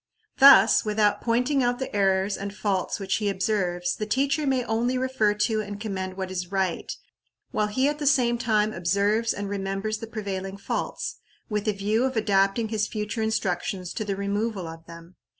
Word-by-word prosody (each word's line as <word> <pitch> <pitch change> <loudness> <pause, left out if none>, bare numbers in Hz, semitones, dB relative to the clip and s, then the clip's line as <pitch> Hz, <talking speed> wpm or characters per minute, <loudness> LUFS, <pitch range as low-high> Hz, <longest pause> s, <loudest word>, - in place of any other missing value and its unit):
Thus, 270 -6 +8
without 210 -1 +1
pointing 250 +4 +1
out 245 0 +1
the 265 -4 -5
errors 195 0 +2
and 200 0 -5
faults 200 -3 -1
which 195 -1 -1
he 210 -2 -1
observes, 180 -3 -1
the 215 - -4
teacher 275 +6 +1
may 260 -2 +1
only 240 +3 0
refer 255 -5 +1
to 215 +1 +1
and 205 -1 -7
commend 190 -3 -4
what 190 -1 -4
is 180 -1 -4
right, 190 -3 -1 0.6
while 210 - 0
he 260 +6 +1
at 295 +1 -1
the 295 - -1
same 245 -4 +3
time 215 -2 +1
observes 200 +6 +1
and 205 0 -4
remembers 195 +2 -3
the 225 - -7
prevailing 195 -3 -5
faults, 195 - -4 0.3
with 210 0 -2
a 215 - +2
view 210 +4 0
of 260 -2 -1
adapting 200 +1 +2
his 215 -1 0
future 210 +1 -3
instructions 190 -4 -2
to 215 - -3
the 200 -2 -2
removal 200 -1 -2
of 165 0 -10
them. 170 +1 -13
210 Hz, 185 wpm, -25 LUFS, 195-230 Hz, 0.6 s, Thus